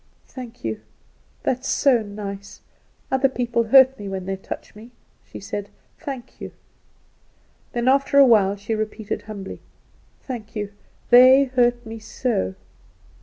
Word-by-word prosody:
"Thank 250 -4 -10
you! 110 -1 -2 0.6
that 255 - 0
is 265 - -7
so 255 -5 +3
nice. 200 -1 -8 0.5
Other 265 +1 +3
people 240 -2 -1
hurt 265 +2 +6
me 200 -1 -6
when 190 -1 -5
they 195 0 -2
touch 190 - -8
me," 220 +3 -12 0.3
she - - -11
said. 200 0 -6 0.3
"Thank 270 -6 -8
you!" - - -7 1.2
Then 240 +1 -1
after 275 +1 +3
a - - +9
little 265 -3 +6
while 200 -3 +4
she 205 +2 -4
repeated 215 -1 -3
humbly, 205 -3 -8 0.6
"Thank 230 -4 -7
you; 205 -1 -4 0.4
they 255 +3 +8
hurt 245 -2 +1
me 225 0 -7
so." 210 - -2
230 Hz, 145 wpm, -22 LUFS, 205-255 Hz, 1.2 s, a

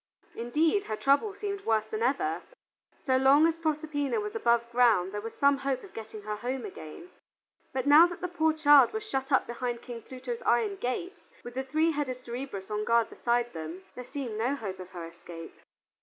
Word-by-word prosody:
Indeed, 310 - +1
her 215 - -3
trouble 280 - +2
seemed 400 -1 -4
worse 220 -1 +1
than 220 0 -5
ever. 285 +11 0 0.6
So 260 -1 +3
long 275 +4 +6
as 330 0 +1
Proserpina 305 +1 -1
was 420 0 -4
above 235 - +2
ground 230 -7 +4
there 205 0 -4
was 225 +1 -7
some 280 0 +4
hope 270 -2 -2
of 395 - -13
getting 220 -1 -8
her 210 0 -4
home 250 +3 -3
again. 185 - -10 0.6
But 260 -1 -2
now 300 +4 +8
that 350 - -8
the 360 - -2
poor 320 -3 +1
child 290 -4 +6
was 440 -1 -4
shut 270 -6 -3
up 270 - +4
behind 240 0 -4
King 235 -2 -7
Pluto's 255 -1 -6
iron 225 -4 +1
gates, 300 - -4
with 240 - -8
the 265 +2 -2
three 310 +5 +1
headed 285 -4 -2
Cerberus 240 -5 -6
on 210 0 -1
guard 230 +1 +2
beside 240 0 0
them, 165 +3 -7
there 250 - -7
seemed 245 -4 -5
no 250 +5 +1
hope 200 -8 -6
of 185 -1 -9
her 175 -3 -7
escape. 165 0 -10
255 Hz, 200 wpm, -29 LUFS, 225-300 Hz, 0.6 s, now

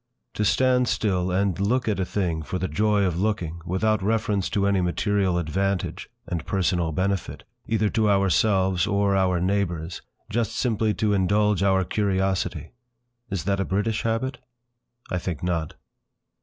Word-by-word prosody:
To 105 - -1
stand 125 +3 +3
still 95 -6 0
and 95 0 0
look 120 +6 +1
at 105 -3 0
a 95 - +1
thing 90 -5 -1
for 85 +4 -4
the 95 - -2
joy 105 +5 +2
of 90 -3 0
looking, 90 -5 -1
without 110 +4 +1
reference 105 -1 0
to 100 -1 0
any 100 -2 +2
material 95 +1 +1
advantage, 95 +3 -2 0.2
and 85 -4 -3
personal 90 -3 0
benefit, 95 +3 -2 0.2
either 110 -1 +1
to 110 -1 +1
ourselves 95 -1 +2
or 100 -1 +2
our 90 -2 +2
neighbours, 90 -3 -1 0.3
just 115 0 -1
simply 110 -3 0
to 105 -2 +1
indulge 100 +1 +2
our 95 -1 +3
curiosity! 95 -5 -1 0.6
Is 95 -5 -3
that 100 +1 0
a - - +2
British 105 +3 -1
habit? 120 +3 -2 0.7
I 90 - 0
think 85 -4 -5
not. 85 -3 -2
100 Hz, 155 wpm, -24 LUFS, 90-105 Hz, 0.7 s, stand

